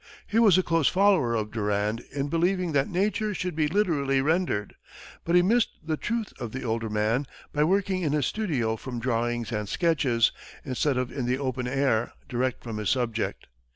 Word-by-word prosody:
He 220 Hz, -, +1 dB
was 205 Hz, -6 st, +6 dB
a 185 Hz, -, +3 dB
close 165 Hz, -4 st, +2 dB
follower 185 Hz, -11 st, +3 dB
of 105 Hz, -1 st, -2 dB
Durand 105 Hz, 0 st, -1 dB
in 140 Hz, 0 st, -2 dB
believing 175 Hz, +3 st, +1 dB
that 140 Hz, -2 st, +1 dB
nature 210 Hz, +3 st, 0 dB
should 180 Hz, -3 st, -3 dB
be 155 Hz, -1 st, +2 dB
literally 150 Hz, -7 st, +1 dB
rendered, 150 Hz, -, 0 dB, 0.5 s
but 170 Hz, -, +2 dB
he 175 Hz, -, +6 dB
missed 230 Hz, +5 st, +3 dB
the 160 Hz, 0 st, -1 dB
truth 230 Hz, +5 st, -3 dB
of 120 Hz, -3 st, -5 dB
the 130 Hz, -, -4 dB
older 115 Hz, -1 st, -2 dB
man 110 Hz, +6 st, 0 dB, 0.3 s
by 150 Hz, -, +2 dB
working 190 Hz, +1 st, +1 dB
in 155 Hz, -5 st, 0 dB
his 150 Hz, -3 st, +1 dB
studio 140 Hz, -, -1 dB
from 125 Hz, +1 st, -6 dB
drawings 120 Hz, 0 st, -1 dB
and 105 Hz, -2 st, -3 dB
sketches, 135 Hz, -9 st, +2 dB, 0.3 s
instead 135 Hz, +1 st, 0 dB
of 125 Hz, -1 st, -1 dB
in 125 Hz, -2 st, -3 dB
the 125 Hz, +1 st, +1 dB
open 130 Hz, -2 st, -2 dB
air 130 Hz, -4 st, +1 dB
direct 125 Hz, 0 st, -2 dB
from 115 Hz, -3 st, -5 dB
his 105 Hz, -1 st, -1 dB
subject. 115 Hz, -4 st, -1 dB
135 Hz, 190 wpm, -27 LUFS, 115-175 Hz, 0.5 s, was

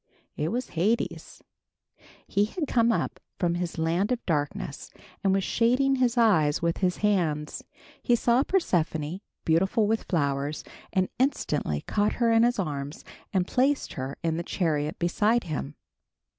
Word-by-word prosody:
It 150 Hz, -, -1 dB
was 245 Hz, +6 st, -2 dB
Hades. 210 Hz, +8 st, -1 dB, 0.8 s
He 205 Hz, +1 st, +2 dB
had 300 Hz, -, -3 dB
come 235 Hz, -2 st, +3 dB
up -, -, -1 dB, 0.2 s
from 175 Hz, -3 st, +1 dB
his 175 Hz, -1 st, -3 dB
land 170 Hz, +7 st, +1 dB
of 245 Hz, -1 st, -2 dB
darkness, 160 Hz, +1 st, -2 dB, 0.3 s
and 195 Hz, -, +3 dB
was 195 Hz, 0 st, +2 dB
shading 255 Hz, +6 st, +2 dB
his 250 Hz, -1 st, +1 dB
eyes 170 Hz, -11 st, +4 dB
with 170 Hz, 0 st, 0 dB
his 180 Hz, -2 st, +1 dB
hands. 160 Hz, -7 st, 0 dB, 0.4 s
He 240 Hz, -, +3 dB
saw 235 Hz, +2 st, +3 dB
Persephone, 175 Hz, -, 0 dB, 0.2 s
beautiful 190 Hz, +7 st, +2 dB
with 220 Hz, +2 st, 0 dB
flowers, 145 Hz, -3 st, -1 dB, 0.3 s
and 185 Hz, -1 st, +1 dB
instantly 150 Hz, -, 0 dB
caught 210 Hz, 0 st, 0 dB
her 235 Hz, -1 st, +2 dB
in 225 Hz, 0 st, +5 dB
his 240 Hz, +1 st, +3 dB
arms 145 Hz, -6 st, -4 dB, 0.3 s
and 185 Hz, -3 st, +1 dB
placed 270 Hz, +7 st, +1 dB
her 130 Hz, +1 st, -5 dB
in 165 Hz, -1 st, 0 dB
the -, -, -1 dB
chariot 155 Hz, -4 st, -1 dB
beside 210 Hz, +7 st, +2 dB
him. 75 Hz, -, -4 dB
185 Hz, 150 wpm, -27 LUFS, 160-230 Hz, 0.8 s, in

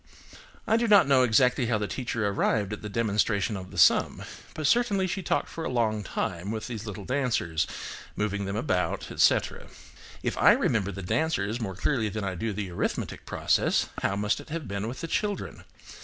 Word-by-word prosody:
I 225 Hz, -, +3 dB
do 235 Hz, 0 st, +1 dB
not 205 Hz, -8 st, +6 dB
know 135 Hz, -2 st, +5 dB
exactly 125 Hz, +1 st, +3 dB
how 115 Hz, -2 st, +2 dB
the 105 Hz, -1 st, -2 dB
teacher 115 Hz, 0 st, -2 dB
arrived 100 Hz, +1 st, 0 dB
at 105 Hz, -, -6 dB
the 105 Hz, -, -6 dB
demonstration 105 Hz, -1 st, +1 dB
of 95 Hz, -1 st, -7 dB
the -, -, -11 dB
sum, -, -, +4 dB, 0.3 s
but 155 Hz, -, -3 dB
certainly 200 Hz, +1 st, +3 dB
she 185 Hz, +1 st, -2 dB
talked 175 Hz, -, 0 dB
for 165 Hz, -, -6 dB
a -, -, -2 dB
long 110 Hz, -4 st, 0 dB
time 90 Hz, -1 st, -3 dB
with 110 Hz, 0 st, -3 dB
these 115 Hz, -3 st, -6 dB
little 100 Hz, -1 st, -6 dB
dancers, 120 Hz, -, 0 dB, 0.5 s
moving 100 Hz, -1 st, -1 dB
them 100 Hz, +1 st, -3 dB
about, 105 Hz, -6 st, -1 dB
etc. -, -, +2 dB, 0.6 s
If -, -, -2 dB
I -, -, +7 dB
remember 100 Hz, -4 st, +1 dB
the 95 Hz, 0 st, -7 dB
dancers 120 Hz, -, 0 dB
more 95 Hz, -4 st, -4 dB
clearly 115 Hz, -, 0 dB
than 105 Hz, +1 st, -4 dB
I 95 Hz, -1 st, -2 dB
do 110 Hz, +5 st, -3 dB
the 100 Hz, -2 st, -4 dB
arithmetic 85 Hz, -, -3 dB
process, -, -, +1 dB
how 100 Hz, -, 0 dB
must 105 Hz, +2 st, 0 dB
it -, -, -12 dB
have 155 Hz, -4 st, -4 dB
been 100 Hz, +2 st, -3 dB
with 125 Hz, +3 st, -6 dB
the 165 Hz, -, -3 dB
children? 205 Hz, +4 st, -3 dB
110 Hz, 195 wpm, -27 LUFS, 100-130 Hz, 0.6 s, I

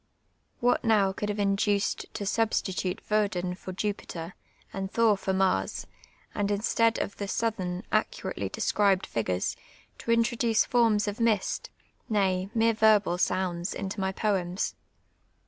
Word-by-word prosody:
Wliat 245 Hz, -, +3 dB
now 210 Hz, -4 st, +3 dB
roxdd 210 Hz, +2 st, -3 dB
have 205 Hz, -, -2 dB
inducfd 200 Hz, 0 st, +1 dB
to -, -, -4 dB
suhsti 215 Hz, -1 st, 0 dB
tulr 180 Hz, 0 st, -2 dB
\\'o<Umi 190 Hz, -4 st, +1 dB
for 185 Hz, -, -8 dB
Jupitrr, 185 Hz, -3 st, -4 dB, 0.4 s
and 195 Hz, 0 st, -3 dB
Thor 225 Hz, 0 st, +3 dB
for 195 Hz, 0 st, -2 dB
Mars, 190 Hz, -, 0 dB, 0.5 s
and 205 Hz, -1 st, -1 dB
instead 225 Hz, +2 st, +2 dB
of 200 Hz, -, -3 dB
the 200 Hz, -, -3 dB
Soutlu'ni. 195 Hz, -4 st, -2 dB
iiceuratcly -, -, -1 dB
drsc'rilKMl 195 Hz, -2 st, +2 dB
fip:ureM, 95 Hz, -5 st, -1 dB, 0.4 s
to 230 Hz, -, -2 dB
introduce 230 Hz, -1 st, +2 dB
forms 225 Hz, -4 st, +3 dB
of 205 Hz, +2 st, -3 dB
mist, 225 Hz, -4 st, 0 dB, 0.4 s
nay, 190 Hz, -3 st, +1 dB
mere 230 Hz, 0 st, +4 dB
verhal 215 Hz, -5 st, +3 dB
sounds, 180 Hz, -1 st, -1 dB
into 200 Hz, +1 st, -4 dB
my 190 Hz, 0 st, 0 dB
poems 190 Hz, -2 st, -1 dB
200 Hz, 135 wpm, -28 LUFS, 190-220 Hz, 0.5 s, mere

